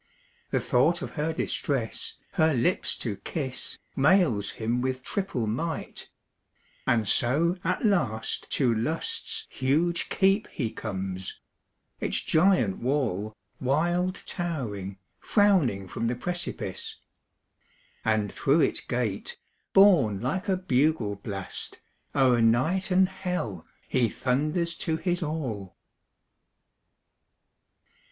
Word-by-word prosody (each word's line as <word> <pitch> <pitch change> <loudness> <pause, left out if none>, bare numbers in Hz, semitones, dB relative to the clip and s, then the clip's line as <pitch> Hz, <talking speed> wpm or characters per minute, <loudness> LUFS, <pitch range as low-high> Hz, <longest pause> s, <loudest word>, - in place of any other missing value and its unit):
The - - +1
thought 150 +8 +2
of - - -5
her 155 +1 -1
distress, 135 -6 -1 0.2
her 160 -2 +3
lips 170 +10 +1
to 105 -5 -3
kiss, 130 +5 -4 0.2
Mails 145 - +3
him 115 +2 0
with 130 0 -2
triple 190 - -2
might; 155 +10 -3 0.8
and 115 -3 +2
so 160 - +3
at 185 +6 0
last 135 - 0
To 125 -5 +3
Lust's 120 +9 -1
huge 160 +6 +1
keep 195 +2 +3
he 115 -7 -3
comes; 95 -3 -5 0.6
its - - 0
giant 160 - +3
wall, 115 -6 -1 0.2
Wild 175 +7 0
towering, 110 - -3 0.2
frowning 165 - +3
from 115 +5 -2
the 120 - 0
precipice; 175 +7 -3 1.1
And 110 -2 +1
through 145 +4 +3
its - - +2
gate, 120 -6 -2 0.3
borne 160 - +6
like 185 - -2
a 190 - +2
bugle 135 - +1
blast, 100 -2 -4 0.4
O'er 125 -3 +4
night 140 +13 +2
and 185 0 +4
hell 180 - -4 0.2
he 120 -3 +2
thunders 155 - 0
to 160 -1 -1
his 175 0 -1
all. 130 - -4
135 Hz, 110 wpm, -27 LUFS, 110-175 Hz, 1.1 s, borne